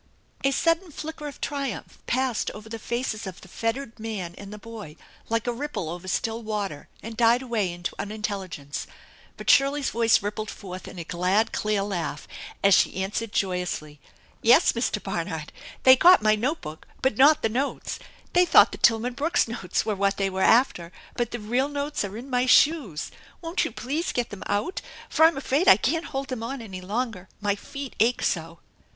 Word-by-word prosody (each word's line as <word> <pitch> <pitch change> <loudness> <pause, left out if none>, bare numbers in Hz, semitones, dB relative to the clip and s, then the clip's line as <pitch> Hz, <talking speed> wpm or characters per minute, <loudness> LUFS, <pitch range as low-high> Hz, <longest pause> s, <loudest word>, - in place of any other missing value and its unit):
A 275 - +4
sudden 330 +6 +1
flicker 305 0 -6
of 285 - -9
triumph 280 -3 -4
passed 255 -2 0
over 210 +1 -10
the 225 0 -6
faces 230 -2 -3
of 185 -2 -8
the - - -13
fettered 230 +4 -3
man 210 -6 -4
and 200 0 -10
the 210 - -7
boy, 210 -8 -9 0.3
like 230 0 0
a 240 - 0
ripple 255 - -4
over 175 +2 -8
still 225 +4 -1
water 205 -9 -4 0.2
and 225 0 -7
died 235 +2 +4
away 220 -7 -1
into 175 0 -5
unintelligence. 195 -9 -4 0.5
But - - -9
Shirley's 275 +1 +3
voice 230 -2 +3
rippled 210 +1 -3
forth 185 -2 -8
in - - -10
a 170 - -4
glad, 185 +6 +1
clear 210 -2 0
laugh, 175 -7 -4 0.4
as 200 0 +6
she - - +4
answered 210 +3 -3
joyously: 180 -7 -2 0.4
"Yes, 235 +2 +6
Mr. 230 -3 -1
Barnard, 165 -5 -4 0.3
they 260 0 +9
got 350 +1 +7
my 215 0 +5
note 255 +10 -1
book, 155 +1 -9 0.2
but 265 -4 +2
not 295 +3 +6
the - - +4
notes! 265 +6 -2 0.3
They 360 - +6
thought 355 - +6
the - - -8
Tilman 235 +2 +3
Brooks 295 +3 +1
notes 225 -6 -2
were 215 - 0
what 200 0 +1
they 195 -1 0
were 190 0 -3
after, 190 -8 +3 0.2
but 240 -1 -1
the 240 - -4
real 245 +6 0
notes 285 -1 -2
are 200 +1 -5
in 245 +4 -8
my 250 -1 +1
shoes. 255 - +3 0.3
Won't 335 +1 -1
you - - -4
please 285 +10 -2
get 245 -1 -2
them 205 - -8
out, 205 - -1 0.3
for 320 - +5
I'm 325 -3 +4
afraid 275 +5 0
I 190 - +9
can't 320 +9 0
hold 270 0 -4
them 255 -3 -4
on 265 +4 -4
any 190 -5 -8
longer, 205 -1 -3
my 205 -1 +1
feet 275 +6 -8
ache 235 +3 +2
so 165 -1 -2
225 Hz, 190 wpm, -25 LUFS, 195-265 Hz, 0.5 s, they